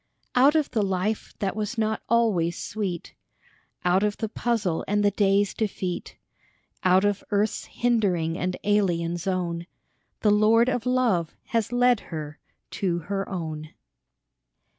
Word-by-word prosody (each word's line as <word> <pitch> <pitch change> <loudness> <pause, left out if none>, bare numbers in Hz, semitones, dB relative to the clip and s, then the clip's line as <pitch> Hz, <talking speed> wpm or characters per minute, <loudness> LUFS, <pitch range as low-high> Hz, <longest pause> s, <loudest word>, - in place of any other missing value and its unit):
Out 275 +5 +5
of 310 -3 +1
the 220 - +1
life 195 +2 -1
that 195 -1 -2
was 215 +2 -3
not 220 0 0
always 205 -8 +2
sweet, 195 -5 -4 0.7
Out 180 +2 +4
of 210 0 0
the 220 - -3
puzzle 215 -8 -1
and 205 0 +1
the 205 - +4
day's 200 0 +2
defeat, 190 -4 -3 0.7
Out 185 +2 +4
of 205 -1 0
earth's 205 +1 0
hindering 195 -9 +1
and 180 0 -2
alien 175 -5 +1
zone, 175 -2 -2 0.5
The 210 - +4
Lord 220 +3 +5
of 245 -2 -2
Love 235 -10 +1
has 230 -1 0
led 245 -1 +4
her 155 -4 -7 0.3
to 180 -3 -1
her 195 0 -1
own. 155 -4 -5
205 Hz, 140 wpm, -25 LUFS, 180-220 Hz, 0.7 s, Out